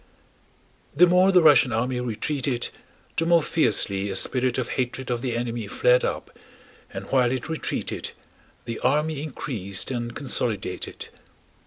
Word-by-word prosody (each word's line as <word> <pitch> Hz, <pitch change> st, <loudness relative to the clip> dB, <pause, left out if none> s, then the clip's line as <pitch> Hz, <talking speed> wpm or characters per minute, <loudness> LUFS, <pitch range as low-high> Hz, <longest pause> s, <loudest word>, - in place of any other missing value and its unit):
The 175 Hz, +5 st, +7 dB
more 180 Hz, +2 st, +4 dB
the 180 Hz, -3 st, +5 dB
Russian 135 Hz, -5 st, +6 dB
army 125 Hz, +3 st, -1 dB
retreated 125 Hz, +2 st, -2 dB, 0.5 s
the 165 Hz, -, 0 dB
more 170 Hz, -2 st, +5 dB
fiercely 100 Hz, -11 st, +1 dB
a 95 Hz, -, -3 dB
spirit 125 Hz, +4 st, 0 dB
of 130 Hz, -, -2 dB
hatred 130 Hz, 0 st, -3 dB
of 120 Hz, -1 st, -1 dB
the 120 Hz, -2 st, -2 dB
enemy 120 Hz, -2 st, -3 dB
flared -, -, +3 dB
up, 485 Hz, -, -3 dB, 0.6 s
and -, -, -6 dB
while 125 Hz, -2 st, +3 dB
it 130 Hz, -1 st, -3 dB
retreated 160 Hz, -1 st, -3 dB, 0.5 s
the 115 Hz, -1 st, -5 dB
army 150 Hz, +3 st, +1 dB
increased 120 Hz, -10 st, -4 dB
and 120 Hz, -1 st, -4 dB
consolidated. 110 Hz, -8 st, -3 dB
125 Hz, 140 wpm, -24 LUFS, 120-150 Hz, 0.6 s, The